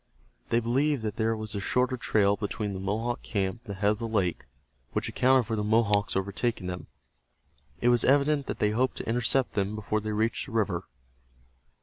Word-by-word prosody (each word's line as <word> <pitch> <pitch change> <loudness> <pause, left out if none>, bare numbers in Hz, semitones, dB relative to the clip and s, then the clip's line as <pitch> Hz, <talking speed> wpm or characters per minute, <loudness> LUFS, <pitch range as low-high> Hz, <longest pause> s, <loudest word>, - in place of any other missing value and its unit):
They 115 - +3
believed 130 +3 +1
that 105 -2 -3
there 110 +1 +1
was 110 -1 -5
a 100 - -2
shorter 125 +5 +1
trail 100 -4 +2
between 105 -1 -3
the 95 - -5
Mohawk 110 +5 -2
camp 100 +1 -2
and 100 -4 -5
the - - -14
head 105 0 +4
of 105 - -3
the 115 - -3
lake, 100 -7 -1 0.5
which - - -1
accounted 130 -1 +3
for 110 - -2
the 105 - -1
Mohawks 105 -1 +2
overtaking 100 +2 -1
them. 90 0 -5 0.9
It 120 - +4
was 120 -1 +4
evident 140 +1 +3
that - - -3
they 105 - +2
hoped 125 +4 0
to - - -5
intercept 120 +3 +1
them 100 0 -1
before 110 0 -1
they 110 +1 -3
reached 110 +5 0
the 125 - -10
river. 95 -5 0
110 Hz, 200 wpm, -28 LUFS, 100-120 Hz, 0.9 s, head